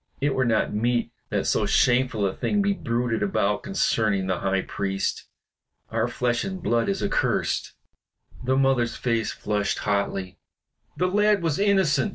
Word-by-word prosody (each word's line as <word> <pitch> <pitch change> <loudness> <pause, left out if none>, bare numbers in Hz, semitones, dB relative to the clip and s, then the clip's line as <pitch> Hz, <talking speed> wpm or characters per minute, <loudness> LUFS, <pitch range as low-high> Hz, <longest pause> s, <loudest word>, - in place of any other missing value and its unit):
It 140 0 +1
were 130 -1 +1
not 110 -3 +1
meet 120 +2 0 0.2
that - - -1
so - - +1
shameful 125 -4 +2
a 95 - 0
thing 205 -1 0
be 200 0 +2
bruited 120 - -1
about 105 0 0
concerning 110 - 0
the 95 -1 -1
High 95 -1 0
Priest. 95 -1 -2 0.7
Our 115 +1 +1
flesh 120 0 -1
and 190 -1 -4
blood 120 -9 +1
is 100 - -1
accursed." - - 0 0.7
The 130 +1 +1
mother's 130 -4 +2
face 115 -3 -1
flushed 105 -1 -1
hotly. 100 -2 -2 0.6
"The 180 - +1
lad 210 0 +2
was 160 -1 0
innocent!" 190 -10 +3
120 Hz, 155 wpm, -25 LUFS, 105-145 Hz, 0.7 s, innocent